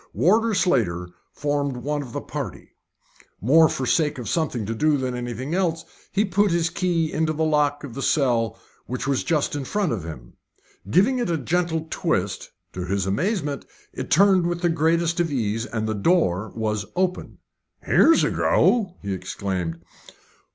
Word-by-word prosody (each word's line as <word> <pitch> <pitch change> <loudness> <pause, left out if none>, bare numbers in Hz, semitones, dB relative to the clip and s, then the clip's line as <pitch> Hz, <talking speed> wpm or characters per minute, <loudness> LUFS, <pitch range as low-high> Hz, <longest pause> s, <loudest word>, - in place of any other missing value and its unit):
Warder 220 +5 +3
Slater 100 - +1 0.2
formed 145 -2 -1
one 145 +4 -2
of 130 -4 -8
the - - -4
party. - - -6 0.7
More 155 - +5
for 135 - -3
the - - -1
sake 150 -4 +2
of 125 - -6
something 140 -10 -1
to 110 - -2
do 150 +5 +2
than 130 -2 -2
anything 125 +4 -4
else, 165 -3 0 0.3
he 205 +2 +2
put 200 +1 +2
his 170 -1 +1
key 170 -3 0
into 155 0 0
the 160 +1 -1
lock 150 -1 +1
of 135 -5 -7
the 135 - -5
cell 120 -6 +1 0.3
which 125 +1 -4
was 140 -1 0
just 155 -4 0
in 145 - -3
front 200 +5 -1
of 105 -8 -3
him. 75 -7 -9 0.6
Giving 210 - +3
it 240 - -1
a 165 - +1
gentle 165 +2 -1
twist, - - -1 0.2
to 90 - -4
his 95 0 -1
amazement 145 - -1 0.3
it - - -5
turned 190 0 +5
with 175 0 -2
the 175 - +2
greatest 165 +1 +1
ease, 115 -8 -1
and 110 -3 -3
the 110 - -1
door 105 - +1
was 105 -2 -1
open. 180 0 -1 0.5
"Here's 330 - +5
a - - +1
go!" 200 -7 +2
he 100 -1 -2
exclaimed. 90 -3 -4
150 Hz, 170 wpm, -23 LUFS, 115-175 Hz, 0.7 s, More